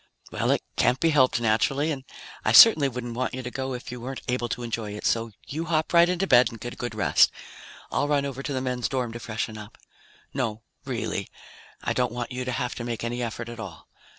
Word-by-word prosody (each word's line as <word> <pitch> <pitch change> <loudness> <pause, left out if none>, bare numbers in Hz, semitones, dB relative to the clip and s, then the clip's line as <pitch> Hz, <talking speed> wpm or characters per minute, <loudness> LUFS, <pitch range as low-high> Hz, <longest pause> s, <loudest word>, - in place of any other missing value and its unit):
"Well, - - -1
it - - +2
can't 125 +2 +3
be 165 - +3
helped 130 -5 +4
naturally, 120 +7 +1
and 135 -3 -4 0.4
I - - +2
certainly 155 -12 +9
wouldn't 120 -1 -5
want 125 +1 -2
you 130 - -5
to 125 - -5
go 130 0 -3
if 125 - -8
you 125 -1 -7
weren't 130 +2 -6
able 125 -1 -1
to 120 - -3
enjoy 110 -3 -4
it. 105 - -7
So 115 0 +1 0.2
you 160 +4 -4
hop 160 0 0
right 170 0 +6
into 180 +1 0
bed 125 -8 +6
and 115 - -10
get 120 +2 -6
a - - -12
good 120 -2 -5
rest. 105 - +4 0.6
I'll 145 - +1
run 145 -1 +1
over 135 -1 -5
to 145 - -4
the 130 -2 -1
men's 125 -2 -1
dorm 125 -3 -1
to 120 - -7
freshen 110 -1 -4
up. 105 0 -11 0.6
No, 115 -5 -2 0.2
really, - - -3 0.6
I - - 0
don't 125 -2 0
want 120 0 -4
you 125 0 -3
to 125 - -2
have 125 0 -2
to 120 - -4
make 120 -1 -4
any 120 +1 -2
effort 115 0 -4
at 120 0 -8
all. 95 -8 -9
125 Hz, 235 wpm, -26 LUFS, 115-135 Hz, 0.6 s, certainly